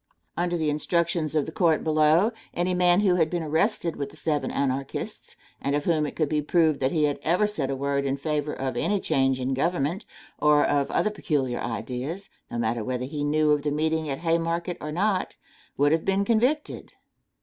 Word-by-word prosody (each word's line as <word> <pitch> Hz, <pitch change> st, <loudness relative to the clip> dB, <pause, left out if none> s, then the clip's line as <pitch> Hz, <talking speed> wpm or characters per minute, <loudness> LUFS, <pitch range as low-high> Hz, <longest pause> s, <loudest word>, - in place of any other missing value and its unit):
Under 175 Hz, 0 st, 0 dB
the 155 Hz, -2 st, 0 dB
instructions 165 Hz, +1 st, 0 dB
of 150 Hz, -, +2 dB
the -, -, -6 dB
court 170 Hz, -7 st, +2 dB
below, 155 Hz, +6 st, +3 dB, 0.2 s
any 175 Hz, +1 st, 0 dB
man 180 Hz, +1 st, +4 dB
who 185 Hz, -3 st, +3 dB
had 160 Hz, -2 st, +2 dB
been 175 Hz, -1 st, -2 dB
arrested 165 Hz, +2 st, 0 dB
with 140 Hz, -1 st, -3 dB
the 145 Hz, -, -16 dB
seven 155 Hz, -1 st, -1 dB
Anarchists 135 Hz, 0 st, -3 dB, 0.3 s
and 140 Hz, -, 0 dB
of 145 Hz, -, -1 dB
whom 155 Hz, -3 st, +2 dB
it -, -, -8 dB
could 155 Hz, -, +1 dB
be 150 Hz, +1 st, 0 dB
proved 160 Hz, -1 st, +2 dB
that 130 Hz, 0 st, +1 dB
he 155 Hz, -2 st, +1 dB
had 145 Hz, -1 st, +1 dB
ever 180 Hz, +6 st, +2 dB
said 160 Hz, -10 st, -2 dB
a 135 Hz, -, -1 dB
word 140 Hz, +1 st, -1 dB
in 135 Hz, 0 st, -1 dB
favor 150 Hz, 0 st, -2 dB
of 130 Hz, -2 st, -3 dB
any 205 Hz, -1 st, 0 dB
change 135 Hz, -6 st, +1 dB
in 130 Hz, +1 st, -1 dB
government, 170 Hz, +5 st, -1 dB, 0.3 s
or 150 Hz, 0 st, +4 dB
of 140 Hz, -1 st, +1 dB
other 215 Hz, -, +1 dB
peculiar 140 Hz, -11 st, -1 dB
ideas, 125 Hz, -, -4 dB, 0.2 s
no 120 Hz, -, -5 dB
matter 115 Hz, 0 st, -1 dB
whether 125 Hz, +1 st, -2 dB
he 145 Hz, +2 st, -4 dB
knew 150 Hz, +1 st, +2 dB
of 150 Hz, -1 st, +2 dB
the 150 Hz, -, -1 dB
meeting 155 Hz, +1 st, 0 dB
at 135 Hz, -, -1 dB
the -, -, -13 dB
Haymarket 170 Hz, +1 st, 0 dB
or 150 Hz, -, -4 dB
not, 190 Hz, +3 st, 0 dB, 0.4 s
would 145 Hz, +1 st, +3 dB
have 160 Hz, 0 st, +2 dB
been 195 Hz, +1 st, +1 dB
convicted. 250 Hz, +8 st, 0 dB
155 Hz, 205 wpm, -26 LUFS, 140-175 Hz, 0.4 s, man